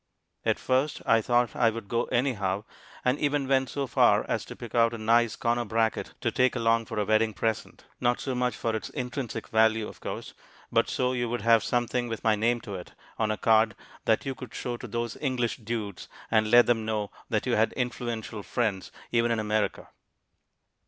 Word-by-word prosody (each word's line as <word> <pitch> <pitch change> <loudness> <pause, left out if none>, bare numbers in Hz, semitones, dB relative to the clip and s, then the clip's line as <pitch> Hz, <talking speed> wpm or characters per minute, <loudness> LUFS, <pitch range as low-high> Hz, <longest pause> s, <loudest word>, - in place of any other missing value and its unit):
At - - +2
first 130 +3 0
I 115 0 +4
thought 120 -1 +1
I 115 - +4
would 115 -2 -6
go 115 +3 0
anyhow, 105 -6 0 0.4
and 125 +3 +2
even 145 -2 0
went 135 -1 +2
so 140 -1 -2
far 125 - +4
as - - -1
to - - -9
pick - - -9
out 115 0 +3
a - - -5
nice 115 +1 +3
corner 120 +1 0
bracket 115 0 -1
to - - 0
take 130 +1 +2
along 115 -1 +2
for - - -5
a 105 - +1
wedding 110 +1 +2
present. 110 -1 -3
Not 120 0 +1
so 135 - -3
much 125 -2 0
for 115 +1 -1
its 110 - -4
intrinsic 125 -2 -4
value, 110 -1 +3
of - - -11
course, - - -6 0.4
but - - +2
so 125 0 0
you 120 -2 -1
would 120 -1 -2
have 115 0 +5
something 120 0 0
with 115 -1 -5
my 110 -1 +4
name 115 +3 +1
to 105 -3 -7
it 90 -2 -8 0.3
on 110 -1 +1
a 110 - 0
card 110 0 +3 0.3
that 110 +4 +2
you 135 - -2
could 130 -3 -10
show 120 - -3
to 120 - -8
those 115 +1 -3
English 125 -4 0
dudes, 110 -4 -5 0.2
and 110 -1 +3
let 120 +1 +7
them 115 -2 +2
know 110 -2 -2 0.2
that - - 0
you - - +1
had - - +3
influential 120 -3 -3
friends, 105 -3 -2 0.2
even 115 0 +2
in 115 - +1
America. 110 0 -1
115 Hz, 205 wpm, -28 LUFS, 110-120 Hz, 0.4 s, let